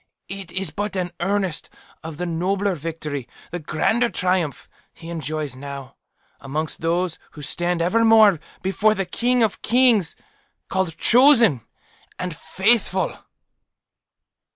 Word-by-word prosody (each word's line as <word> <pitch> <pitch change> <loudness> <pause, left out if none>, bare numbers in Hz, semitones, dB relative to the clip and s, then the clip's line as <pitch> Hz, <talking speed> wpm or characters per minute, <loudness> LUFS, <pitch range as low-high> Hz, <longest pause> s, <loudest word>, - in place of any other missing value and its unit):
It 195 -3 -6
is 185 -4 -2
but 205 +5 -4
an 180 -2 -2
earnest 190 -2 -1 0.3
of 160 -2 -7
the 180 - -3
nobler 190 +4 -1
victory, 150 -4 -5 0.2
the 175 - -4
grander 220 +10 +1
triumph, 180 -8 -1 0.3
he 165 0 -9
enjoys 155 -3 -3
now, 140 0 -8 0.4
amongst 150 +3 -4
those 170 +1 -1
who 150 - -10
stand 175 +3 0
evermore 220 -1 +5 0.2
before 210 +3 +2
the 195 - -2
King 245 +6 +1
of 215 - -1
kings 235 -7 +3 0.5
CALLED, 190 -4 -1
CHOSEN, 235 - +6 0.6
AND 180 -3 -4
FAITHFUL." 190 +1 +1
180 Hz, 120 wpm, -22 LUFS, 160-205 Hz, 0.6 s, CHOSEN